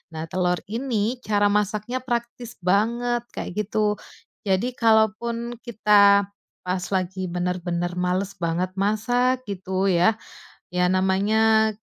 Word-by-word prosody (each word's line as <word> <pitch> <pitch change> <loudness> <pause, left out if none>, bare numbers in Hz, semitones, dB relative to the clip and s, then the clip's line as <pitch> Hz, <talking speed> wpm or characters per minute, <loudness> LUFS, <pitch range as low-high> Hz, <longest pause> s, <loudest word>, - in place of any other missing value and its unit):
Nah, 160 +1 -5
telur 180 -1 0
ini 235 0 -2
cara 205 -1 +2
masaknya 210 +4 -1
praktis 235 -1 -4
banget, 235 +5 +1
kayak - - -5 0.2
gitu. 210 -1 +1 0.5
Jadi, 195 +6 +1
kalaupun 230 +1 +1
kita 205 -3 +5 0.4
pas 180 0 -2
lagi 185 0 -2
benar-benar 175 0 -2
malas 185 +2 0
banget 175 +2 -1
masak, 245 +5 +1
gitu 190 -1 -2
ya, 180 +5 +3 0.6
ya 180 0 +2
namanya, 215 +4 +3
205 Hz, 110 wpm, -23 LUFS, 185-230 Hz, 0.6 s, kita